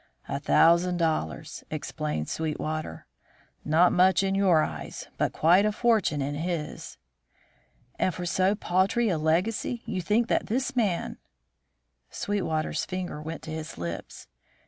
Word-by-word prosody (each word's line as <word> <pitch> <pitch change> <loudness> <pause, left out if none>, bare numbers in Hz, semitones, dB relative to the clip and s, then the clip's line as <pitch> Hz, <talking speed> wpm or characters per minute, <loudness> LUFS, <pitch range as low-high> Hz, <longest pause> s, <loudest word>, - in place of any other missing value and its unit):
"A 140 - -2
thousand 170 +4 +4
dollars," 155 - -2
explained 75 0 -3
Sweetwater. 155 - -3 0.6
"Not 165 +4 +4
much 185 +2 +4
in 195 0 0
your 185 -5 +4
eyes, - - -6
but - - +1
quite 175 +5 +4
a 215 - +2
fortune 210 - +1
in 140 +1 -2
his." 160 0 -4 1.0
"And 185 - +2
for 180 0 -6
so 185 +3 +2
paltry 195 +4 +1
a 170 -5 0
legacy 185 +9 0
you 185 - -2
think 215 +6 +1
that - - 0
this 260 +4 -1
man 205 -8 0 0.5
" - - -50
Sweetwater's 175 -6 -2
finger 180 -5 -4
went 160 +2 -6
to 160 - -7
his 160 0 -6
lips. 85 -6 -6
175 Hz, 140 wpm, -27 LUFS, 155-195 Hz, 1.0 s, thousand